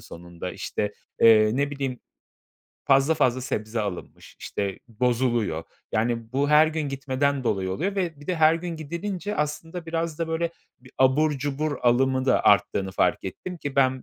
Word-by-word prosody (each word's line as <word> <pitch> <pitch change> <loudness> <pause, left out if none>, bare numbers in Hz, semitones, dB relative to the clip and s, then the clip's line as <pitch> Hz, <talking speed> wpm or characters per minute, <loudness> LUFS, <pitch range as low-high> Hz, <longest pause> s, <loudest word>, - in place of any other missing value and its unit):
sonunda. 85 +1 -8
İşte, 105 0 -3 0.3
eee, 110 -1 +7
ne 140 +1 +1
bileyim, 135 -3 -4 0.8
fazl 135 +3 +4
fazla 130 -4 +2
sebze 110 -3 -3
alınmış, 100 -4 -7
işte, 100 -2 -4
bozuluyor. 120 -7 0 0.3
Yani, 115 +1 -1
bu 140 +2 +1
her 150 +1 +7
gün 155 -2 -2
gitmeden 135 0 -1
dolayı 95 -4 0
oluyor 195 - -2
ve 170 -6 -2
bir 145 - -13
de 180 - -1
her 160 0 +5
gün 170 0 -4
gidilince 180 +6 -4
aslında 160 +3 -3
biraz 165 -1 -2
da, 165 -1 -2
böyle, 165 +1 -1 0.3
bir 130 0 -17
abur 130 +4 +4
cubur 145 +1 -2
alımı 130 +2 +3
da - - +3
arttığını 100 -1 +3
fark - - +1
ettim 180 -1 -6
ki 140 -2 -5
ben 130 -1 +3
135 Hz, 165 wpm, -25 LUFS, 115-155 Hz, 0.8 s, eee